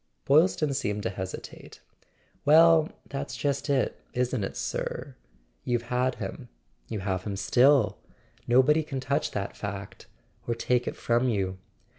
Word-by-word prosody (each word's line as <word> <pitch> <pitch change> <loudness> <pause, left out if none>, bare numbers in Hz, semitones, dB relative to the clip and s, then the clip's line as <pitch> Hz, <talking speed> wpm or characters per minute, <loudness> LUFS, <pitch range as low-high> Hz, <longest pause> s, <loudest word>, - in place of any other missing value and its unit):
Boylston 155 0 +3
seemed 105 -6 -2
to 115 - -1
hesitate. 95 -1 -8 0.6
"Well, 160 +1 +6 0.2
that's 140 0 -5
just 140 0 -1
it, 135 -2 0
isn't 125 -3 0
it, - - -4
sir? - - -4 0.5
You've 120 -1 0
had 125 +1 +1
him; - - -7 0.4
you 110 -3 -3
have 95 -2 -1
him 100 -2 -4
still. 125 +4 +3 0.5
No¬ 130 +2 +6
body 150 +3 +4
can 145 -3 -5
touch 135 +2 0
that 100 -1 -4
fact, 100 -1 -7 0.4
or 120 - 0
take 125 +1 0
it - - -3
from 120 +2 +1
you. 95 -4 -1
125 Hz, 145 wpm, -27 LUFS, 105-140 Hz, 0.6 s, Well